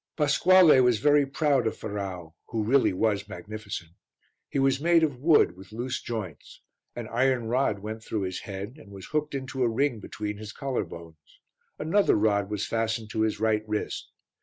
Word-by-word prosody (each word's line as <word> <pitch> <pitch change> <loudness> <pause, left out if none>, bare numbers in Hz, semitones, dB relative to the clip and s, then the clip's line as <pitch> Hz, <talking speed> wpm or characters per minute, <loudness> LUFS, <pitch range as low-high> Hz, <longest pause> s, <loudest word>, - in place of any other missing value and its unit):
Pasquale 165 +1 +6
was 125 -3 +4
very 145 +4 +4
proud 135 -4 +1
of - - -3
Ferrau 95 -6 -5
who 110 -2 -2
really 130 +5 +3
was 105 +1 0
magnificent. 105 -6 -7 0.6
He - - -3
was 135 0 +2
made 170 0 +4
of 145 -5 0
wood 150 - +4
with 95 +2 -14
loose 120 +4 -3
joints. 100 -10 -7 0.3
An 120 -2 -5
iron 125 0 +1
rod 125 -3 +1
went 110 +1 -6
through 110 -1 -3
his 95 -1 -3
head, 100 +6 -7
and 105 -7 -15
was 95 -2 -9
hooked 150 -1 -2
into 130 -1 -4
a 120 - +3
ring 120 +1 0
between 105 0 -5
his 105 0 -8
collar 135 -3 -2
bones. 80 -3 -13 0.4
Another 180 +7 +2
rod 100 -2 +1
was 105 -1 -2
fastened 115 -1 -2
to 110 - -1
his 110 -2 0
right 110 -1 +1
wrist. 105 0 -3
110 Hz, 180 wpm, -27 LUFS, 105-135 Hz, 0.6 s, Pasquale